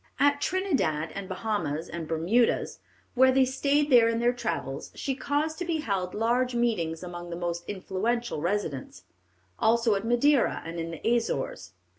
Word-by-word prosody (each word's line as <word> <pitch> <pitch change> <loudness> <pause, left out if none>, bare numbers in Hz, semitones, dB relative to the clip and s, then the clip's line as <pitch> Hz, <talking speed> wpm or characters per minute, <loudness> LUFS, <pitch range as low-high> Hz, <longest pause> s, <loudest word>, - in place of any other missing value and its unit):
At 285 +1 +3
Trindad, 270 - 0
and 195 -1 -6
Bahamas, 185 -6 -2
and 170 -2 -6
Bermudas, 175 +10 +1 0.3
when 260 0 +5
they 265 -1 +5
stayed 285 +3 +1
there 235 -2 +7
in 230 - 0
their 240 +1 +3
travels, 165 - -4
she 275 - -2
caused 295 +4 -1
to - - -1
be 330 -2 -1
held 190 -7 -2
large 240 +3 +1
meetings 180 -9 0
among 175 -1 -7
the 170 - -4
most 170 0 -3
influential 205 +1 -2
residents; 160 - -3 0.6
also 230 0 +3
at 195 0 -1
Madeira 240 +4 +2
and 165 +1 -5
in 165 0 -3
the 165 +5 -5
Azores. 135 - -3
220 Hz, 160 wpm, -27 LUFS, 170-255 Hz, 0.6 s, there